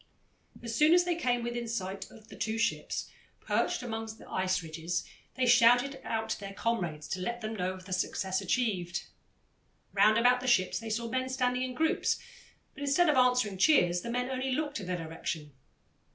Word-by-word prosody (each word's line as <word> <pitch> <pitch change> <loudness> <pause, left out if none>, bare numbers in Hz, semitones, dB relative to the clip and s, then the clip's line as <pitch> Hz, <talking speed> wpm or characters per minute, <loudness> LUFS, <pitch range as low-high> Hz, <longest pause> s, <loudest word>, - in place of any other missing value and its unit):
As 230 -1 -4
soon 305 +6 +6
as 355 - +5
they 350 0 0
came 245 -7 0
within 240 0 -3
sight 195 -3 -4
of 220 -1 -16
the - - -10
two 220 0 -2
ships, 230 - -1 0.3
perched - - 0
up - - -5
among 225 0 -3
the - - -14
ice 185 -1 0
ridges, 165 +2 -3 0.3
they 260 - +1
shouted 245 +3 +5
out 225 0 -2
to - - -2
their 195 -1 -7
comrades 175 -11 -2
to 190 - -2
let 235 +6 -3
them 220 0 -4
know 185 -2 -1
of 185 0 -11
the 185 - -5
success 190 +1 -1
achieved. 190 -4 -1 0.9
Round 210 +2 +5
about 245 +2 +4
the 255 - -5
ships 185 -7 +3
they 225 0 -6
saw 230 +2 -2
men 255 +2 -1
standing 250 -1 0
in 255 -1 -3
groups, 320 +2 +1 0.6
but - - -12
instead 285 +5 +3
of 300 - +3
answering 250 -6 +3
cheers, 180 - +4
the 235 - -6
men 250 +2 -1
only 260 0 -1
looked 290 -2 -2
in 195 - -7
their 180 -1 -1
direction. 160 -2 -5
230 Hz, 195 wpm, -30 LUFS, 185-250 Hz, 0.9 s, soon